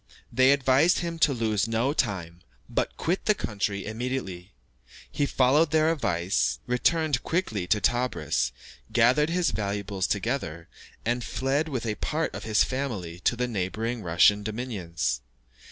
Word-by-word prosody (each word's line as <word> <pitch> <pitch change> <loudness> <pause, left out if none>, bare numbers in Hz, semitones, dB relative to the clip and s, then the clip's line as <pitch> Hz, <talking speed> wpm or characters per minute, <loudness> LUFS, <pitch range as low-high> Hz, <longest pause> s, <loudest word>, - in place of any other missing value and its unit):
They 130 +1 +5
advised 140 +5 +3
him 170 -1 -4
to 150 - +4
lose 110 -4 0
no 115 +5 +1
time, 90 - -2 0.3
but - - -2
quit 175 +4 -1
the 215 - +4
country 100 - -2
immediately. 110 -5 -4 0.6
He 145 - 0
followed 140 +6 +3
their 155 +1 +3
advice, 90 - 0
returned 145 +2 +1
quickly 115 - -2
to 105 - +2
Tebris, 115 - 0 0.4
gathered 125 +6 +4
his 175 0 +1
valuables 100 -2 -2
together, 85 - -2 0.4
and 120 +1 0
fled 140 +7 -1
with 125 -5 -3
a 110 - 0
part 160 +1 -1
of - - -7
his 110 -1 +3
family 110 -11 -4
to 120 - +1
the 125 +1 -1
neighbouring 110 +3 -2
Russian 90 +4 +4
dominions. 90 - -3
115 Hz, 140 wpm, -27 LUFS, 100-140 Hz, 0.6 s, They